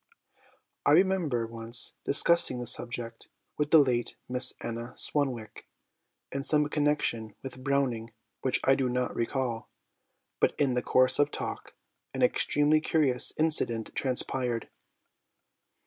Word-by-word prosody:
I 145 - +4
remember 170 -9 +2
once 115 +1 -2
discussing 145 -2 +3
this 120 -1 0
subject 115 -1 -6 0.3
with 150 0 +1
the 160 - +7
late 125 -5 +2
Miss 125 0 -3
Anna 115 +1 -6
Swanwick 125 -7 -3 0.6
in 140 0 -3
some 150 0 +2
connection 145 -8 0
with 130 -1 -8
Browning 125 -5 0 0.3
which 130 - +2
I 135 - +5
do 135 -1 0
not 125 0 -1
recall, 120 -1 -2 0.7
but - - +1
in 140 -3 +2
the 125 - 0
course 130 +1 +3
of 145 0 +4
talk - - -6 0.4
an - - 0
extremely 150 +1 +3
curious 145 -6 +1
incident 150 -8 +2
transpired. 125 -2 -1
130 Hz, 125 wpm, -29 LUFS, 120-145 Hz, 0.7 s, the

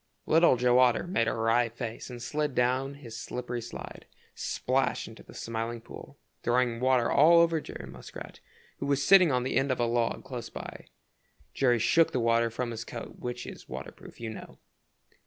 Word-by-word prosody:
Little 165 -5 +5
Joe 125 +1 +4
Otter 125 +3 +4
made 175 - 0
a - - +1
wry 115 +1 +2
face 115 +1 -6
and 125 -1 -8
slid 150 +2 -2
down 130 +3 +1
his 120 -6 -10
slippery 120 +1 -5
slide, 115 - -9 0.3
splash - - -1
into - - -12
the - - -15
Smiling 115 +1 -4
Pool, - - -12 0.2
throwing 120 -1 +1
water 125 -1 +2
all 165 +4 +6
over 165 -1 +4
Jerry - - -8
Muskrat, - - -10 0.4
who - - -3
was 140 -1 +1
sitting 185 -5 +7
on 125 -1 +1
the 130 - -1
end 135 0 +2
of 130 - -1
a 120 - +2
log 120 0 0
close 125 -4 -6
by. - - -9 0.7
Jerry 125 -3 +3
shook 165 +8 +3
the 130 - +1
water 115 0 +2
from 120 +1 -3
his 115 0 -5
coat, 115 -1 -8
which 125 0 -5
is - - -10
water - - -6
proof, - - -15
you 115 -1 -5
know. 110 - -10
125 Hz, 190 wpm, -29 LUFS, 115-135 Hz, 0.7 s, sitting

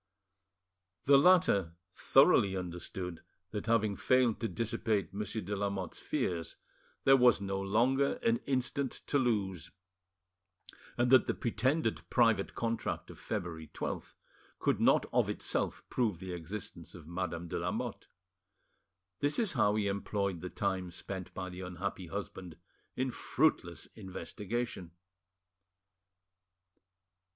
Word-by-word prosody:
The 140 0 +7
latter 120 - +4 0.2
thoroughly 95 -1 +5
understood 90 -1 -5 0.3
that, 105 +1 -4
having 110 -3 +2
failed 130 -2 +3
to 115 - -1
dissipate 110 -3 -1
Monsieur 105 +2 -3
de 100 +3 -3
Lamotte's 100 -3 -3
fears, 85 -2 -2 0.5
there 135 - +7
was 125 -4 +6
no 95 -1 -2
longer 125 +8 +2
an 115 0 +3
instant 135 0 -1
to 145 - +2
lose, 95 -9 0 1.3
and 120 +1 +2
that 130 - +7
the - - 0
pretended 130 +7 0
private 115 -5 +3
contract 115 0 -2
of - - -13
February 80 -3 -4
12th - - -5 0.5
would - - +3
not - - +5
of - - +3
itself - - -2
prove 110 -8 0
the 95 -1 -6
existence 90 +4 -7
of 85 - -11
Madame 85 0 -4
de - - -3
Lamotte. - - -3 1.1
This 145 +1 +1
is 225 -5 +1
how 105 -5 +3
he 105 -1 +1
employed 100 -2 -1
the 90 - -5
time 95 -1 -1
spent 95 +1 -6
by 90 -1 -4
the 90 0 -7
unhappy 90 0 -4
husband 95 -3 -6 0.4
in 130 0 -1
fruitless 85 - 0
investigation. 105 -1 -5
100 Hz, 125 wpm, -32 LUFS, 90-120 Hz, 1.3 s, The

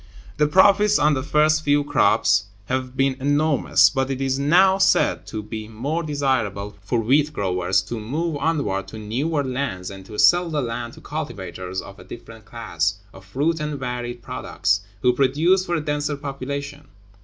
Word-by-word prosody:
The 150 0 +3
profits 200 +5 +5
on 150 +1 +3
the 130 - -1
first 155 +3 +2
few 145 0 +2
crops 110 -7 +2 0.2
have 130 +2 -3
been 135 -1 +2
enormous, 145 +2 +3
but 135 -1 -1
it 135 -1 -3
is 135 0 -1
now 185 +7 +4
said 190 - +2
to 110 -1 -5
be 110 0 -7
more 135 +10 -3
desirable 130 - -1
for 115 +4 0
wheat 140 +7 +2
growers 95 -5 0
to 115 +4 -5
move 150 +8 -3
onward 145 - -1
to - - -9
newer 135 +9 -2
lands, 125 -9 -3
and 95 -1 -10
to 105 - -9
sell 175 +12 +4
the 155 -2 -1
land 120 0 -4
to - - -14
cultivators 95 - -5
of 100 - -12
a - - -11
different 115 -2 -12
class 100 -6 -2 0.2
(of 95 - -13
fruit 145 +12 -1
and 150 -2 -4
varied 120 -1 -5
products), 100 +4 -1 0.2
who 125 - +4
produce 155 +9 +2
for 175 - 0
a 160 - -1
denser 150 0 -2
population. 140 +1 -6
135 Hz, 175 wpm, -22 LUFS, 110-150 Hz, 0.2 s, profits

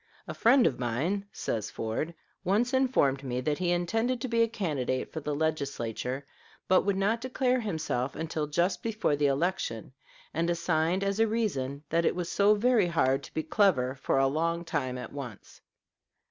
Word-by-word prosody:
"A - - -4
friend 245 +2 +5
of 125 - +1
mine," 155 - -1
says 110 - -3
Ford, 115 +10 -3 0.3
"once 215 +7 +1
informed 245 - +2
me 125 -2 -2
that 145 +3 -1
he 180 -1 0
intended 225 +9 0
to 260 - -2
be 230 -1 +2
a 230 - +5
candidate 150 - -2
for 160 - -3
the 150 -1 -3
Legislature, 140 -4 -2 0.4
but 185 - +5
would 200 0 0
not 205 +4 +1
declare 255 0 +1
himself 160 - -2
until 160 -1 -3
just 170 +6 0
before 220 -9 0
the 145 0 +2
election, 140 - -1 0.4
and 165 +1 0
assigned 170 +2 +1
as 200 +1 -1
a 225 - +4
reason 150 - -2
that 165 +1 +2
it - - +2
was 175 -1 -3
so 205 +1 +4
very 220 -2 +3
hard 135 -5 +2
to - - -12
be 160 - 0
clever 150 - +2
for 135 0 -1
a 135 - +4
long 165 +5 0
time 130 -6 -2
at 125 - -7
once." 130 -7 -9
165 Hz, 180 wpm, -29 LUFS, 135-205 Hz, 0.4 s, friend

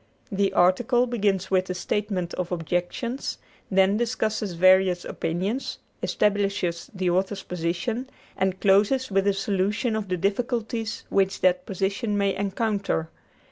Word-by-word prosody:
The 195 0 +1
"article" 215 +8 +3
begins 200 -6 0
with 185 -1 +3
the 185 - -3
statement 185 -2 -2
of 180 -1 -3
objections, 175 - -2 0.3
then 195 +1 +4
discusses 220 -4 -1
various 185 0 +4
opinions, 195 +10 -2 0.2
establishes 195 -4 0
the 185 -2 +1
author's 190 +2 0
position, 180 +9 -2 0.3
and 190 0 0
closes 205 +6 +3
with 195 +1 +2
a 200 - +4
solution 200 +4 0
of 215 -2 -3
the 180 - 0
difficulties 225 +3 -2
which 195 0 +1
that 180 -1 +2
position 200 +3 -1
may 200 -1 +2
encounter. 200 -4 -1
195 Hz, 130 wpm, -25 LUFS, 185-215 Hz, 0.3 s, then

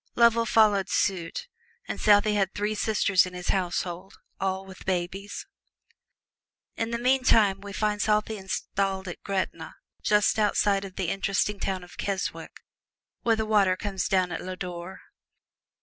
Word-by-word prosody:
Lovell 235 -1 +4
soon - - -3
followed 210 -3 +4
suit, 185 - -1 0.4
and - - -4
Southey 210 0 +5
had 195 -2 0
three 210 +1 -1
sisters 200 -4 +2
in 180 - -9
his 180 0 -5
household, 180 0 -2 0.2
all 190 0 -1
with 190 -1 -12
babies. 190 +2 -3 1.3
In 225 - -2
the 235 - -1
meantime 235 -6 +3
we 200 0 -8
find 210 +1 -1
Southey 215 +1 +1
installed 190 0 -2
at 175 - -7
"Greta," 190 -5 -3 0.3
just 210 +1 +3
outside 205 -1 +2
of 190 -1 -10
the 185 -3 -2
interesting 195 +1 0
town 190 -2 -2
of 175 - -14
Keswick, 195 -1 -4 0.6
where 230 -1 +3
the 220 0 -1
water 200 -4 +3
comes 195 -2 -2
down 185 -2 +1
at - - -4
Lodore. 180 0 -6
195 Hz, 150 wpm, -27 LUFS, 185-210 Hz, 1.3 s, Southey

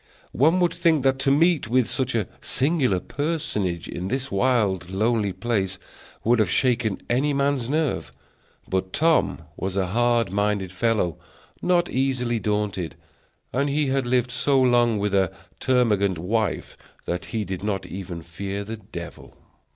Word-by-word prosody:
One 160 +8 +4
would 175 - +3
think 165 -5 +2
that 135 0 +2
to 135 - +2
meet 155 -1 +3
with 125 +1 +2
such 130 -3 -1
a 110 -5 0
singular 135 - +1
personage 125 - -2
in 90 +2 -4
this 130 +4 -2
wild, 100 -5 +1
lonely 105 +1 +1
place 95 -3 -1 0.5
would 120 +1 +3
have 105 -5 +3
shaken 120 -2 +1
any 140 +4 +1
man's 140 -3 +1
nerves; 155 -1 0 0.6
but 95 0 -2
Tom 160 0 +2
was 95 0 -3
a 95 - +2
hard 115 +1 +1
minded 100 -2 0
fellow, 90 -3 0 0.4
not 175 -1 +2
easily 125 -3 0
daunted, 105 -5 -2 0.6
and 140 +3 +1
he 145 0 +1
had 135 -2 0
lived 125 0 +1
so 135 +2 +2
long 120 -3 +4
with 100 0 -1
a 95 -2 +3 0.3
termagant 105 -7 +2
wife 105 +5 -1 0.3
that 90 +1 -3
he 110 -2 -3
did 95 0 -5
not 95 -3 -2
even 90 -2 -6
fear 100 +5 -5
the 110 +2 -6
devil. 95 -5 -10
115 Hz, 150 wpm, -24 LUFS, 95-135 Hz, 0.6 s, One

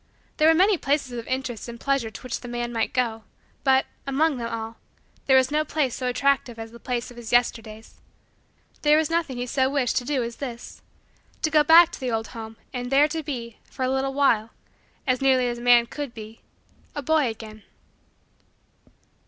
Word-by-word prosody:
There 305 - +4
were 325 - +6
many 380 +1 +4
places 280 -2 0
of 230 - -9
interest 255 -3 -3
and 235 0 -8
pleasure 275 -4 0
to - - -11
which 255 - -4
the 245 - -9
man 240 0 -4
might 225 -1 0
go, 230 -3 -1 0.4
but, 265 -1 +4 0.2
among 285 +1 +1
them 235 -1 -4
all, 225 0 -5 0.5
there 265 -1 +6
was 260 0 +3
no 305 +1 +2
place 295 -5 -1
so 255 - -3
attractive 250 -1 +1
as 225 0 -8
the 235 - -13
place 245 -1 -3
of 240 - -14
his 235 -2 -7
Yesterdays. 225 -2 -1 0.8
There 300 0 +5
was 315 0 0
nothing 330 -6 -1
he 245 - -2
so 260 +1 +1
wished 275 -4 0
to 250 - +1
do 260 -1 -1
as 235 0 -6
this: 245 -4 -7 0.6
to 315 - +1
go 305 -1 +5
back 330 +2 +7
to - - -8
the 260 -2 -2
old 225 -1 -2
home 225 -2 -9 0.2
and 245 0 -4
there 285 +2 +5
to 320 +1 -3
be, 240 -7 -6
for 260 - -3
a 255 - 0
little 270 0 -1
while, 230 -6 +3 0.6
as 255 -2 +1
nearly 260 -2 +3
as 240 0 -3
a - - -9
man 240 -1 +6
could 280 0 -6
be, 220 0 -10 0.5
a 290 - -4
boy 315 -2 +2
again. 220 -1 -7
255 Hz, 200 wpm, -24 LUFS, 235-280 Hz, 0.8 s, back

